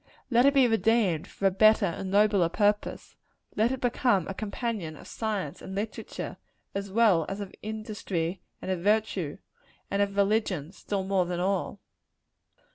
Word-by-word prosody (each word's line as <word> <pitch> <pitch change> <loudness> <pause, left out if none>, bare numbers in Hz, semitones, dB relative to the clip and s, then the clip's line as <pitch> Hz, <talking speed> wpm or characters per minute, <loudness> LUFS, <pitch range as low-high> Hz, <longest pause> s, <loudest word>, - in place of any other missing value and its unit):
Let 240 +3 +5
it 280 - +3
be 265 -2 +6
redeemed, 225 -7 +2
for 195 - -5
a 195 - +5
better 215 +3 +5
and 180 +3 -3
a - - -5
nobler 200 -4 +4
purpose. 205 +3 0 0.4
Let 220 +3 +2
it 265 - -2
become 240 -7 +1
a 195 - -3
companion 205 -5 -4
of - - -13
science 205 -9 -3
and 190 - -7
literature, 210 +2 -5 0.4
as 200 0 -4
well 205 -6 +4
as 195 - -4
of 200 -2 -6
industry 205 -5 -3 0.2
and 190 - -2
of 185 - -1
virtue 200 -5 0 0.5
and 200 - +1
of 200 0 -1
religion, 200 -6 +1
still 195 0 -3
more 190 -2 +1
than 175 0 -2
all. 195 +1 -1
200 Hz, 165 wpm, -28 LUFS, 185-220 Hz, 0.5 s, be